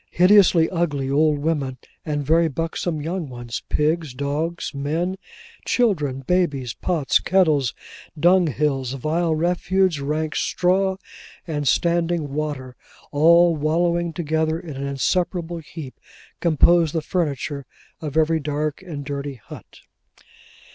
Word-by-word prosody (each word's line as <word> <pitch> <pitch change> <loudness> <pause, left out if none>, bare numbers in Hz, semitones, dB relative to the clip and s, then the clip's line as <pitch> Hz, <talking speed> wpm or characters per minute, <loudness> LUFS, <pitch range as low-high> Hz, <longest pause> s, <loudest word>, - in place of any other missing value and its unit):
Hideously 180 -3 +5
ugly 145 -6 -1
old 150 +1 +3
women 145 -4 -1 0.3
and 145 -2 -2
very 165 +3 +4
buxom 160 +1 -3
young 165 -1 -3
ones, 120 -2 -6
pigs, 155 -2 0
dogs, 150 +5 -3
men, 160 +7 -2 0.5
children, 150 - +1
babies, 140 -6 0
pots, 165 -7 +1
kettles, 155 -9 +2 0.4
dung 175 +2 +5
hills, 135 -2 -1
vile 160 +4 0
refuse, 180 +1 +1
rank 155 +2 -2
straw, 190 +1 +1 0.5
and 145 -4 -3
standing 170 -1 +1
water, 145 -4 -4 0.4
all 170 +3 +5
wallowing 170 +3 0
together 160 0 -1
in 160 -5 -8
an 140 +1 -4
inseparable 170 +4 -1
heap, 150 -3 -10 0.4
composed 170 0 +3
the 160 - 0
furniture 145 -5 -2 0.3
of 150 -1 -4
every 160 0 +3
dark 150 +1 -3
and 155 -7 -7
dirty 140 -1 -4
hut. 110 - -13
155 Hz, 120 wpm, -22 LUFS, 145-170 Hz, 0.5 s, Hideously